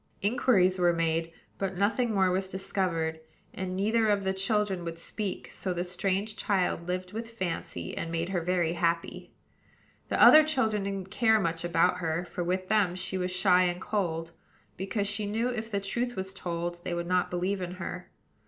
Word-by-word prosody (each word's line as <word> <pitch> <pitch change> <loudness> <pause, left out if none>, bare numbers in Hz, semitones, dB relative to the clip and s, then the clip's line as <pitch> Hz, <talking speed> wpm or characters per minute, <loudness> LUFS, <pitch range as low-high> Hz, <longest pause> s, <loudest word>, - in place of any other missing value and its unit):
Inquiries 195 -4 +3
were 175 -1 +4
made; 165 0 0 0.3
but 190 -2 -2
nothing 225 +5 +1
more 190 -3 +3
was 190 +1 0
discovered, 180 -4 -1 0.3
and 185 -1 -4
neither 220 +3 +2
of 205 -2 +2
the 190 0 0
children 195 -1 0
would 165 -1 -5
speak: 195 +3 -4
so 185 -2 -2
the 175 - -1
strange 195 +3 -1
child 185 -5 0
lived 180 +1 -3
with 225 +1 -5
Fancy, 175 - -4
and 165 - -4
made 165 +1 -1
her 185 -3 0
very 175 -1 +1
happy. 170 -1 -1 0.8
The - - 0
other 310 0 +10
children 240 -9 +1
didn't 195 -1 -4
care 220 0 +4
much 165 -3 -1
about 170 -1 +2
her; 165 0 -1
for 175 - -4
with 185 +2 -1
them 200 -4 +2
she 185 +1 -4
was 180 0 -1
shy 180 0 +4
and 175 0 -1
cold, 170 -5 -2 0.4
because 200 +2 -2
she 205 0 -2
knew, 225 +4 0
if 225 -2 -4
the 200 -3 -1
truth 240 +5 -2
was 190 0 -4
told, 175 -1 -4
they 175 -1 -2
would 170 0 -2
not 180 0 +1
believe 185 +2 -1
in 180 0 -4
her. 185 - -6
185 Hz, 185 wpm, -29 LUFS, 175-205 Hz, 0.8 s, other